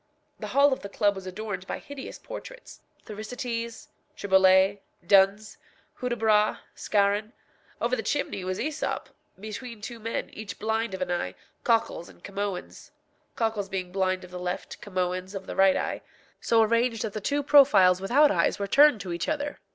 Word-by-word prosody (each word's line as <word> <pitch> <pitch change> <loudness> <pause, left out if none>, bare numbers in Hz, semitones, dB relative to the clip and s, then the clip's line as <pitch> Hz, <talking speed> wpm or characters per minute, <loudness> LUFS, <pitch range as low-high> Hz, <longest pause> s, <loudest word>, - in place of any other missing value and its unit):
The - - -5
hall 280 0 +4
of - - -4
the 200 - -8
club 205 0 +2
was 190 -1 -8
adorned 190 -1 -5
by - - -3
hideous 280 -2 -9
portraits - - -10 0.2
Thersites, 230 +2 -5 0.3
Triboulet, 190 0 +4 0.3
Duns, 200 +2 +3 0.4
Hudibras, 220 -4 +2 0.2
Scarron; 205 +2 0 0.5
over - - +1
the - - -3
chimney 280 -9 -2
was 185 0 -2
Æsop, 305 +3 -2 0.3
between 220 +3 -7
two 235 +2 -7
men, 230 +1 -4
each 205 -3 -8
blind 220 -1 -1
of 185 - -2
an 180 - -4
eye, 95 - -2 0.3
Cocles 225 -7 +1
and - - -19
Camoëns 200 -2 -5 0.5
(Cocles 220 -4 -1
being 185 -2 -4
blind 185 -1 0
of 180 - -12
the 180 - -6
left, 180 0 -5
Camoëns 185 0 -3
of 190 -1 -6
the - - -6
right 195 0 +5
eye), - - -3 0.4
so 225 -1 +3
arranged 230 0 +1
that 215 -3 -4
the 215 - -4
two 285 +7 0
profiles 260 -11 +6
without 280 +9 +4
eyes 170 -3 +1
were 200 - -2
turned 280 +1 +5
to 180 -1 -5
each 170 +11 -3
other. 290 -2 -3
210 Hz, 165 wpm, -27 LUFS, 190-235 Hz, 0.5 s, profiles